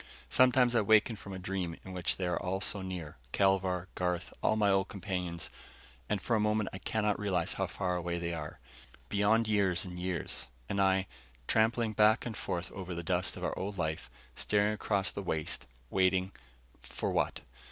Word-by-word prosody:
Sometimes 125 -1 +5
I 115 - +4
waken 110 +2 +4
from 100 -1 -10
a 95 - -4
dream 90 -2 -3
in 95 - -7
which 90 -2 -1
they 95 - -1
are 90 -1 0
all 95 +1 -1
so 100 0 +1
near 90 -7 -6 0.2
Kelvar, 95 -2 +2
Garth, 90 -1 -2
all - - +3
my 105 -2 +3
old 95 0 +2
companions 90 -3 -4 0.6
and 105 - +1
for 115 - 0
a - - +3
moment 105 -1 +1
I 95 - -5
cannot 105 -1 0
realize 100 -3 0
how - - -1
far 90 -1 -1
away 85 0 -2
they 85 0 -2
are. 75 -2 -6 0.5
Beyond 105 +2 +3
years 100 -3 +2
and 90 -1 -7
years. 90 -8 -2 0.2
And 100 - 0
I, 95 0 +3 0.4
trampling 110 0 +2
back 110 +2 +4
and 115 -3 -4
forth 90 -1 -3
over 90 -3 -6
the 85 - -4
dust 90 +1 0
of - - -7
our - - -1
old 100 +1 -4
life, 80 -2 -2 0.2
staring 105 - +2
across 100 -2 0
the - - -5
waste, 80 -5 -2 0.2
waiting 95 0 +2 0.5
for - - -3
what? - - 0
95 Hz, 185 wpm, -32 LUFS, 90-105 Hz, 0.6 s, Sometimes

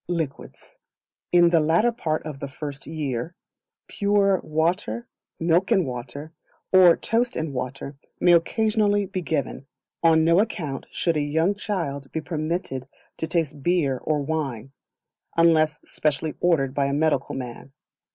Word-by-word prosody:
Liquids. 160 -6 -5 0.5
In 175 -1 +5
the 170 - +5
latter 165 +10 +3
part 160 -10 -2
of 150 -3 -6
the 140 - -4
First 145 +1 -7
Year, 150 0 -3 0.5
pure 200 -2 +2
water, 170 +9 -1 0.3
milk 170 +3 +2
and 195 -7 +3
water, 130 +5 -7 0.4
or 180 -2 +7
toast 240 +2 0
and 160 -3 -3
water 135 +2 -5 0.2
may 175 - +5
occasionally 205 +3 +2
be 190 -1 -4
given. 145 -4 -3 0.3
On 160 -1 +5
no 170 +3 +4
account 165 -11 -2
should 165 -3 0
a - - +1
young 160 +6 +1
child 165 -10 -4
be 160 - -2
permitted 155 -5 -3 0.3
to 160 - -3
taste 155 -4 -1
beer 145 -5 +1
or 150 +1 -1
wine, 135 -5 -3 0.7
unless 155 -3 +4
specially 150 +1 -1
ordered 145 -7 +2
by 140 -1 +1
a 140 - -1
medical 155 +2 0
man. 125 +1 -7
160 Hz, 140 wpm, -24 LUFS, 140-180 Hz, 0.7 s, or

